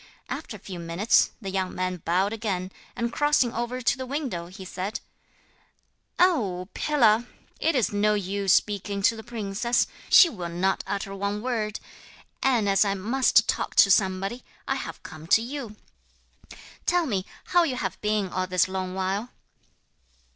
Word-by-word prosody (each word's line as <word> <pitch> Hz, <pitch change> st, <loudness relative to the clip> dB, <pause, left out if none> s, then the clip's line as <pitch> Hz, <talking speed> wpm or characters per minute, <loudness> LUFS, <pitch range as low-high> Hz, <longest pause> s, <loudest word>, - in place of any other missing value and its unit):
After -, -, -5 dB
a -, -, -20 dB
few 185 Hz, -3 st, -8 dB
minutes 170 Hz, +6 st, +2 dB
the 195 Hz, -, -4 dB
young 190 Hz, -1 st, -2 dB
man 185 Hz, 0 st, -2 dB
bowed 180 Hz, +5 st, 0 dB
again, 195 Hz, -5 st, -3 dB, 0.2 s
and 235 Hz, 0 st, -2 dB
crossing 295 Hz, -5 st, +2 dB
over 240 Hz, +2 st, -3 dB
to 235 Hz, -, +2 dB
the 260 Hz, -, -3 dB
window, 250 Hz, -, -3 dB
he 190 Hz, +1 st, -10 dB
said: 185 Hz, +3 st, -4 dB, 1.2 s
'Oh, 205 Hz, -, +2 dB
pillar! 240 Hz, -6 st, +3 dB, 0.3 s
it 325 Hz, -, +1 dB
is 240 Hz, -5 st, +1 dB
no 210 Hz, +1 st, +2 dB
use 200 Hz, -1 st, -1 dB
speaking 200 Hz, 0 st, +1 dB
to 230 Hz, -, +4 dB
the 220 Hz, -, -8 dB
princess, 230 Hz, +1 st, -1 dB, 0.2 s
she 360 Hz, -, +9 dB
will 180 Hz, -, -5 dB
not 185 Hz, +3 st, 0 dB
utter 200 Hz, -1 st, -3 dB
one 200 Hz, +2 st, -3 dB
word; 220 Hz, -4 st, -2 dB, 0.6 s
and 245 Hz, -6 st, +2 dB
as 195 Hz, +1 st, +4 dB
I 200 Hz, -1 st, 0 dB
must 235 Hz, +7 st, +3 dB
talk -, -, -1 dB
to 195 Hz, -, +7 dB
somebody, 195 Hz, +5 st, +1 dB, 0.2 s
I -, -, +1 dB
have -, -, -6 dB
come 155 Hz, -1 st, -10 dB
to 225 Hz, -, +5 dB
you. 245 Hz, -4 st, -6 dB, 1.1 s
Tell 350 Hz, -1 st, +3 dB
me 200 Hz, -9 st, -1 dB, 0.3 s
how 350 Hz, -, +5 dB
you 305 Hz, -7 st, 0 dB
have 190 Hz, -6 st, -4 dB
been 210 Hz, -2 st, 0 dB
all 185 Hz, 0 st, -2 dB
this 185 Hz, -1 st, +2 dB
long 185 Hz, -1 st, -4 dB
while?' 195 Hz, +5 st, -2 dB
205 Hz, 160 wpm, -26 LUFS, 185-240 Hz, 1.2 s, she